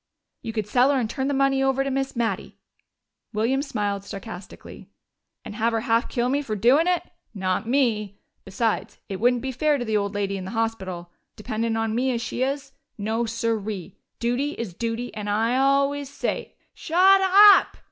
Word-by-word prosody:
"You 225 - -5
could 215 -2 -2
sell 245 +6 +3
her 280 -2 +2
and 235 - -1
turn 265 +4 -3
the 285 - 0
money 270 0 +2
over 270 0 +2
to 275 - -2
Miss 270 0 -2
Mattie." 225 -5 -2 0.8
William 235 +6 +1
smiled 205 -8 -2
sarcastically. 200 -1 -10 0.6
"And - - -7
have 230 +2 0
her 225 - 0
half 230 +1 +1
kill 240 -2 0
me 280 +3 +1
for 220 -7 -4
doin' 255 - +4
it? 360 -1 +1 0.3
Not 190 +2 -1
me! 220 -7 +1 0.3
Besides, 220 +3 -2
it 190 -1 -4
wouldn't 245 +1 +2
be 265 - -2
fair 295 +3 +1
to 245 - -4
the 220 - -3
poor 210 - +3
old 200 0 -4
lady 200 -1 -1
in 185 - -6
the 225 +4 -6
hospital. 190 -6 -3 0.2
Dependin' 225 +1 -2
on 225 -1 -1
me 250 +3 +1
as 235 - -1
she 240 - -4
is. 275 +1 -2 0.3
No, 225 +3 -1
siree! 220 -4 -3 0.2
Duty 250 +5 -1
is 225 -6 -6
duty, 230 +4 -4
and 210 -1 -5
I 225 +4 +1
always 275 +1 +2
say 280 - -4
" - - -44
"Shut 380 +4 +4
up!" 400 +2 +7
230 Hz, 190 wpm, -24 LUFS, 215-270 Hz, 0.8 s, up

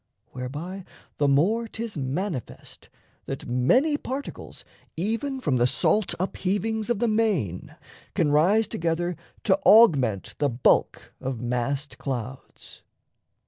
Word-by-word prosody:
Whereby 150 +10 -6 0.4
the 145 - +3
more 195 +12 +2
'Tis 225 0 -6
manifest 140 - -5 0.4
that 135 - -5
many 245 - +3
particles 275 0 -7 0.3
Even 230 - -2
from 145 - 0
the 120 0 +3
salt 210 - +1
upheavings 205 +4 -1
of 240 - +1
the 235 +3 +1
main 205 - 0 0.4
Can 150 - +2
rise 190 +9 +4
together 170 +1 -1 0.3
to 190 -2 +3
augment 160 - +5
the 145 -1 +2
bulk 120 0 +1
Of 130 -2 -3
massed 125 +4 -3
clouds. 130 -1 -6
170 Hz, 115 wpm, -25 LUFS, 130-220 Hz, 0.4 s, augment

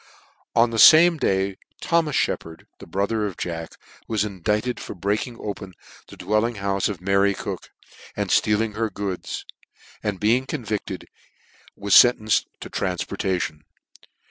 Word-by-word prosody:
On 115 0 +4
the 115 - -2
fame 165 +5 +8
day 95 -6 0 0.2
Thomas 165 -4 +1
Sheppard 80 0 -2
(the - - -11
bro 95 +4 0
ther 110 0 -1
of 95 - -7
Jack) 85 -2 -5 0.3
was 110 -2 0
indicted 105 +5 -2
for - - -7
breaking 105 +6 -2
open 100 -3 -6 0.3
the - - -13
dwclling 110 +5 0
houfe 100 -1 -1
of 95 -4 -6
Mary 100 +1 +2
Cook, - - -6 0.5
and - - -2
ftealing 105 +1 +2
her 110 +1 -1
goods, 100 -3 -5 0.6
and 100 -3 -3
being 120 +5 +2
convicted, 105 -9 -4 0.7
was 100 0 -1
fentcnced 110 -3 +6 0.2
to - - -7
tranfportation. 90 -3 -2
105 Hz, 140 wpm, -23 LUFS, 95-115 Hz, 0.7 s, fame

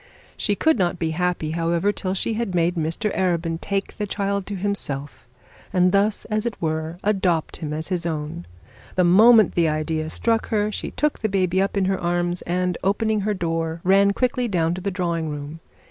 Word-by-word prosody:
She 205 - 0
could 320 +1 +2
not 175 -2 +1
be 160 -1 -1
happy, 175 -2 -1
however, 170 +4 +1
till 190 -2 -3
she 225 - -1
had 215 -4 -2
made 170 0 +2
Mr 170 +5 -2
Arabin 170 -3 0
take 195 0 -3
the 210 - -1
child 200 -1 -2
to 205 - -4
himself, 150 -10 -3 0.4
and 180 -1 +3
thus, 200 +2 +1
as 215 +1 -1
it 225 - -5
were, 160 +1 -2
adopt 185 -6 0
him 155 -3 -5
as 155 +2 -4
his 180 -2 -1
own. 150 - -4 0.5
The 185 - +3
moment 215 +4 +6
the 170 -2 +2
idea 155 +1 -2
struck 225 +6 0
her 210 -1 0
she - - -4
took 300 0 -1
the 220 - -1
baby 185 -2 +1 0.2
in 195 -1 +2
her 190 0 0
arms, 175 0 -1
and, 180 0 0
opening 215 +2 +1
her 210 +1 0
door, 165 -2 -2
ran 195 +2 +5
quickly 250 +2 0
down 170 -5 +1
to 185 - -5
the 200 - -1
drawing 170 -4 -2
room. 150 +2 -6
180 Hz, 190 wpm, -23 LUFS, 165-200 Hz, 0.5 s, moment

